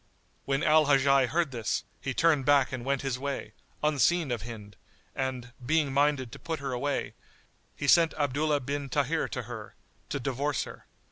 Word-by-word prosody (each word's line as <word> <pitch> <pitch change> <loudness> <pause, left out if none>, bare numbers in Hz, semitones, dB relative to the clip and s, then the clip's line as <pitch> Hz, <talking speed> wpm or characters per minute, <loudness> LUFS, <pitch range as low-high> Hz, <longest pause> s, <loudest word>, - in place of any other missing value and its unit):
[FN#95] - - -38 0.4
When 135 0 0
Al 155 0 +5
Hajjaj 135 -2 +4
heard 160 +2 0
this, 115 -5 -2 0.2
he 135 - -3
turned 155 0 +3
back 140 -1 +4
and 130 -2 -4
went 140 +1 -1
his 130 -2 -2
way, 135 -6 -4 0.3
unseen 150 +1 +2
of 120 -3 -2
Hind; 105 -3 -9 0.4
and, 130 -2 -3
being 145 +1 +1
minded 140 -3 +2
to - - -9
put 165 -1 -4
her 140 -1 -4
away, 135 +3 -2 0.6
he 145 - -4
sent 165 +2 +5
Abdullah 145 0 +1
bin 140 +2 -3
Tahir - - 0
to - - -4
her, - - -8 0.3
to 140 - -2
divorce 135 +2 -1
her. - - -11
140 Hz, 180 wpm, -29 LUFS, 130-145 Hz, 0.6 s, Al